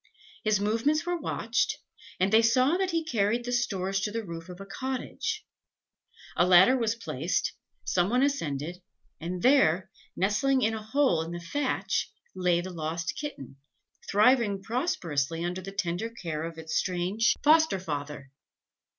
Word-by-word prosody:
His 215 -2 +2
movements 230 +10 +1
were 350 -1 -1
watched, 235 -5 -1 0.4
and 190 +3 +1
they 225 - +7
saw 255 +7 +3
that 380 -1 0
he 330 -2 -1
carried 235 -3 0
the 245 - -3
stores 195 -6 0
to 200 - -1
the 225 +1 -4
roof 170 0 -8
of 180 0 -9
a 195 - -8
cottage. 260 +6 -4 0.9
A - - +4
ladder 185 +7 +7
was 230 -3 0
placed, 175 - -2 0.3
some 180 +1 +1
one 250 +3 +3
ascended, 175 - -2 0.4
and 175 +2 -5
there, 190 - +4 0.2
nestling 255 +8 +2
in 225 - +2
a 220 - -4
hole 220 - +2
in 165 - -5
the 175 0 -5
thatch, 195 -1 -1 0.2
lay 180 -2 +2
the 185 +1 -6
lost 165 +2 -3
kitten, 140 - -7 0.5
thriving 210 -2 +3
prosperously 170 - -1
under 180 +1 -3
the 195 +2 -7
tender 195 +2 -2
care 165 -8 -5
of 165 0 -7
its 160 0 -5
strange 185 +5 +1
foster 315 -6 +5
father. 145 -5 -5
195 Hz, 155 wpm, -28 LUFS, 175-245 Hz, 0.9 s, they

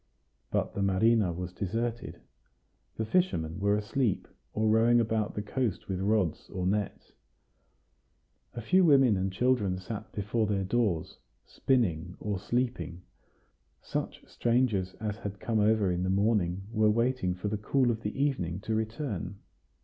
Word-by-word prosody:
But - - -1
the 100 - -3
marina 100 +1 +3
was 90 +1 -5
deserted. 115 -2 -3 0.7
The 110 - -2
fishermen 105 - 0
were 100 +1 +2
asleep, 105 0 -1 0.2
or 110 +1 0
rowing 115 +2 +5
about 110 -2 0
the 105 - -2
coast 115 -2 -2
with 95 -2 -2
rods 100 -4 0
or 90 -1 -3
nets; 100 +2 -2 1.4
a 120 - -4
few 185 - +4
women 135 - +5
and 95 0 -1
children 105 -3 +1
sat 105 +3 -7
before 105 +2 -1
their 100 -2 0
doors, 100 -5 -1 0.3
spinning 90 -9 0
or 105 -3 -2
sleeping: 120 -6 -2 0.8
such - - -4
strangers 115 -6 +1
as 105 -2 -4
had 100 -3 -6
come 110 +1 0
over 105 -2 +3
in 90 0 -1
the 95 - 0
morning 95 -2 +1
were 110 -1 +3
waiting 115 -4 +1
for 90 +3 -4
the 105 +1 -1
cool 125 +3 +2
of 115 -1 -4
the 105 +4 -4
evening 100 - 0
to 110 - -2
return. 110 - -3
105 Hz, 150 wpm, -29 LUFS, 95-115 Hz, 1.4 s, rowing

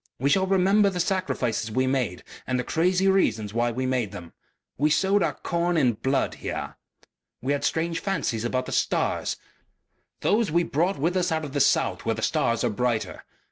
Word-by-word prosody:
We 140 +3 +1
shall 190 +2 +3
remember 195 +2 +4
the 180 -2 -4
sacrifices 170 - -1
we 130 +4 +1
made 130 -9 -1 0.2
and 130 - 0
the - - -1
crazy 180 +5 +1
reasons 110 - +1
why 120 +1 +1
we 130 +3 -3
made 125 -6 -1
them. 85 -2 -10 0.4
We 150 +3 +2
sowed 190 +6 +2
our - - 0
corn 170 0 -1
in 130 -6 +3
blood 135 +5 0
here. - - -5 0.6
We 135 +3 -1
had 145 - -2
strange 165 +1 0
fancies 120 - -2
about 130 +2 -1
the - - -7
stars. - - 0 0.8
Those 215 0 +2
we 170 +2 +3
brought 170 +5 0
with 170 +6 0
us 180 -1 +1
out 160 -1 -1
of 140 - -8
the 145 - 0
south - - +2
where - - 0
the - - -5
stars 115 -1 +1
are - - +1
brighter. 120 0 -2
145 Hz, 190 wpm, -25 LUFS, 125-180 Hz, 0.8 s, remember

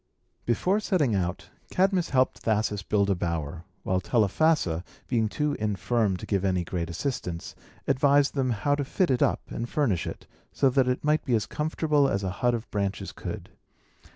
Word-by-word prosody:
Before 180 - +2
setting 180 - +1
out, 90 -2 -2 0.2
Cadmus 190 -2 +2
helped 130 -1 +2
Thasus 105 -2 0
build 100 +1 +1
a - - +5
bower; 85 -2 -3 0.2
while 95 0 0
Telephassa, 105 - +2 0.2
being 115 -3 +1
too 150 +5 -1
infirm 105 -1 0
to - - -8
give 100 -2 0
any 90 -2 +1
great 85 -1 -3
assistance, 90 - -4 0.3
advised 140 +1 +3
them 135 -3 0
how 120 +5 +1
to 145 0 0
fit 170 +4 +1
it 125 - +1
up - - +2
and 120 +1 -4
furnish 125 - 0
it, - - -7 0.3
so 135 - +2
that 130 0 +3
it 125 - 0
might 150 +1 +2
be 125 - +1
as 105 -4 0
comfortable 150 -2 +1
as 100 -3 -1
a 95 - -1
hut 120 -1 +3
of 115 0 -5
branches 100 -1 -2
could. - - -7
115 Hz, 180 wpm, -27 LUFS, 95-145 Hz, 0.3 s, a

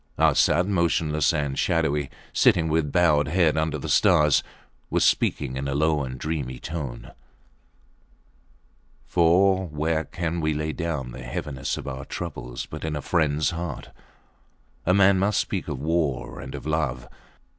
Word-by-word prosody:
Arsat, 90 - +4
motionless 85 -5 +1
and 70 -4 -2
shadowy, 75 -4 +1 0.2
sitting 80 -2 +3
with 75 -2 0
bowed 75 -3 +3
head 85 -1 +2
under 80 -1 0
the 70 - -6
stars, 75 -2 +4 0.5
was - - +1
speaking 65 -3 +1
in 70 +1 -3
a 70 - -2
low 75 0 +2
and 65 0 -6
dreamy 70 -5 -3
tone... 70 -7 -6 1.9
for 95 +2 +3
where 80 +1 -1
can 85 0 -3
we 75 -1 0
lay 75 +1 -2
down 75 -7 -3
the 65 - -9
heaviness 65 +2 -4
of - - -7
our 65 -1 -5
trouble - - -6
but - - -7
in 80 -1 -2
a 75 - -3
friends 80 -2 +1
heart? 85 0 -6 1.0
A 90 - +5
man 100 -1 +5
must 100 +2 +2
speak - - -2
of - - -3
war 80 -3 -1
and - - -7
of - - -8
love. 70 -6 -1
75 Hz, 150 wpm, -25 LUFS, 70-85 Hz, 1.9 s, A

